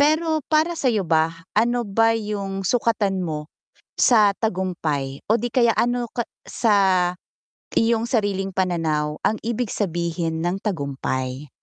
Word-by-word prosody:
Pero 315 Hz, +2 st, +3 dB
para 315 Hz, +2 st, +3 dB
sa 285 Hz, -5 st, 0 dB
'yo 215 Hz, -5 st, +1 dB
ba? 165 Hz, 0 st, +1 dB
Ano 240 Hz, +3 st, +2 dB
ba 225 Hz, +2 st, +2 dB
'yong 200 Hz, -3 st, -4 dB
sukatan 210 Hz, -3 st, +1 dB
mo 155 Hz, -3 st, -4 dB, 0.4 s
sa 210 Hz, -5 st, +5 dB
tagumpay 165 Hz, -10 st, -2 dB
o 225 Hz, -, +4 dB
'di 245 Hz, -, -2 dB
kaya 235 Hz, -2 st, +4 dB
ano 240 Hz, -1 st, 0 dB
ka 240 Hz, -, -2 dB, 0.2 s
sa 220 Hz, -3 st, +1 dB, 1.0 s
iyong 230 Hz, 0 st, +3 dB
sariling 200 Hz, -5 st, 0 dB
pananaw 160 Hz, -5 st, 0 dB
ang 220 Hz, -, +2 dB
ibig 235 Hz, 0 st, -1 dB
sabihin 170 Hz, -3 st, -2 dB
ng 175 Hz, +2 st, 0 dB
tagumpay? 140 Hz, -, -3 dB
200 Hz, 135 wpm, -23 LUFS, 165-230 Hz, 1.0 s, sa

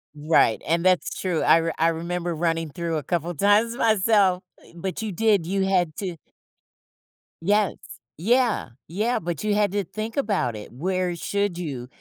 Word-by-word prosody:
Right, 150 Hz, -6 st, +2 dB
and 170 Hz, +3 st, +1 dB
that's 185 Hz, -1 st, +2 dB
true. 180 Hz, -4 st, 0 dB
I 165 Hz, -, +5 dB
r 165 Hz, 0 st, -2 dB
I 165 Hz, -, +3 dB
remember 170 Hz, +1 st, -2 dB
running 165 Hz, 0 st, -1 dB
through 165 Hz, +2 st, -3 dB
a 150 Hz, -, -4 dB
couple 175 Hz, +3 st, -2 dB
times 205 Hz, +7 st, +3 dB
myself, 205 Hz, -5 st, +3 dB, 0.3 s
but 185 Hz, +4 st, -4 dB
you 220 Hz, -2 st, -3 dB
did, 205 Hz, -2 st, +2 dB
you 195 Hz, +1 st, 0 dB
had 180 Hz, -5 st, +1 dB
to 180 Hz, -4 st, -4 dB, 1.2 s
Yes. 205 Hz, +2 st, +2 dB, 0.4 s
Yeah. 235 Hz, -, +1 dB, 0.2 s
Yeah, 215 Hz, +9 st, 0 dB
but 170 Hz, -1 st, -4 dB
you 210 Hz, -1 st, +1 dB
had 205 Hz, -2 st, +2 dB
to 205 Hz, 0 st, -1 dB
think 215 Hz, +5 st, -6 dB
about 200 Hz, -, 0 dB
it. 105 Hz, -, -9 dB
Where 180 Hz, +6 st, -2 dB
should 200 Hz, +1 st, -2 dB
you 135 Hz, -8 st, -5 dB
180 Hz, 165 wpm, -24 LUFS, 165-205 Hz, 1.2 s, I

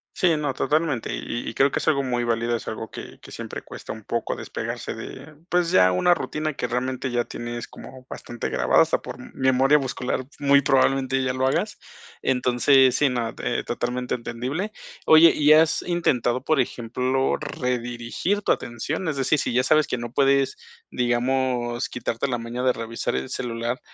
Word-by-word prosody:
Sí, 170 Hz, -4 st, +3 dB
no, 145 Hz, -2 st, -1 dB
totalmente, 150 Hz, -3 st, 0 dB
y 120 Hz, -, -4 dB
y -, -, -10 dB
creo 135 Hz, +1 st, +3 dB
que -, -, -1 dB
es -, -, -5 dB
algo 140 Hz, -3 st, +3 dB
muy 125 Hz, -2 st, -1 dB
válido. 115 Hz, 0 st, 0 dB
Es -, -, -8 dB
algo 110 Hz, 0 st, -5 dB
que -, -, -10 dB
que -, -, -13 dB
siempre -, -, -7 dB
cuesta -, -, -8 dB
un 110 Hz, 0 st, -9 dB
poco 115 Hz, +2 st, -2 dB
despegarse -, -, -5 dB
de 145 Hz, +3 st, -9 dB
pues, 175 Hz, -1 st, +1 dB
ya 90 Hz, 0 st, +5 dB
una 175 Hz, -, +4 dB
rutina 155 Hz, -2 st, -3 dB
que 125 Hz, -, -2 dB
realmente, 130 Hz, +2 st, -2 dB
ya 120 Hz, 0 st, 0 dB
tienes 120 Hz, 0 st, -6 dB
como 130 Hz, -1 st, -12 dB
bastante 120 Hz, -1 st, -5 dB
grabada -, -, +4 dB
hasta -, -, 0 dB
por -, -, -8 dB, 0.2 s
memoria 130 Hz, +2 st, +4 dB
muscular, 130 Hz, -2 st, -3 dB, 0.2 s
muy 140 Hz, 0 st, +5 dB
probablemente 135 Hz, -1 st, +2 dB
ya 130 Hz, -1 st, 0 dB
lo 130 Hz, +1 st, 0 dB
hagas. 135 Hz, -, -1 dB, 0.4 s
Entonces, 130 Hz, +1 st, +4 dB
sí, 145 Hz, -, +3 dB
no, 120 Hz, -3 st, -2 dB
eh, -, -, -1 dB
totalmente 125 Hz, +1 st, -2 dB
entendible. 130 Hz, -, -4 dB, 0.3 s
Oye, 160 Hz, +1 st, +8 dB
¿y 150 Hz, 0 st, +5 dB
has 160 Hz, +1 st, +4 dB
intentado, 130 Hz, -8 st, 0 dB
por 155 Hz, -2 st, +2 dB
ejemplo, 125 Hz, +2 st, 0 dB
redirigir 125 Hz, -, -2 dB
tu -, -, -1 dB
atención? 140 Hz, +9 st, -3 dB
Es 150 Hz, -, -1 dB
decir, 135 Hz, +3 st, +2 dB
si -, -, -1 dB
ya 125 Hz, -, +4 dB
sabes 155 Hz, +3 st, +3 dB
que -, -, -2 dB
no 120 Hz, 0 st, -6 dB
puedes, 140 Hz, 0 st, +2 dB, 0.3 s
digamos, 120 Hz, 0 st, 0 dB
quitarte 120 Hz, +1 st, -3 dB
la 125 Hz, -, 0 dB
maña 115 Hz, +2 st, -5 dB
de 130 Hz, -, +4 dB
revisar 115 Hz, -1 st, -4 dB
el 65 Hz, -, -3 dB
celular, 120 Hz, +1 st, -3 dB
130 Hz, 180 wpm, -24 LUFS, 120-140 Hz, 0.4 s, Oye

